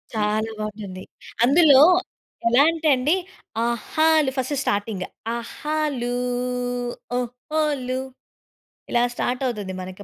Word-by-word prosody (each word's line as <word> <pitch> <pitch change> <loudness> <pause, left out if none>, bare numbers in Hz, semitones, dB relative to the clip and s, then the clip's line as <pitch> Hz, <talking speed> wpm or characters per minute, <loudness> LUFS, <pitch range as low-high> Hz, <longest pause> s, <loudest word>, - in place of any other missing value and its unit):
చాలా 215 +1 0
బాగుంటుంది. 205 -3 -6 0.4
అందులో 280 0 +7 0.7
ఎలా 245 +4 +6
అంటే 325 -1 -2
అండి 285 +8 +2 0.5
ఆహాలు 305 +5 +2
ఫస్ట్ 260 +3 -1
స్టార్టింగ్, 205 -3 -1 0.3
ఆహాలు, 285 -1 -2 1.1
ఓహోలు 255 +1 -2 0.9
ఇలా 240 0 +3
స్టార్ట్ 250 +2 -1
అవుతుంది, 205 -6 -4
మనకి 185 +2 -8
250 Hz, 90 wpm, -23 LUFS, 215-295 Hz, 1.1 s, అందులో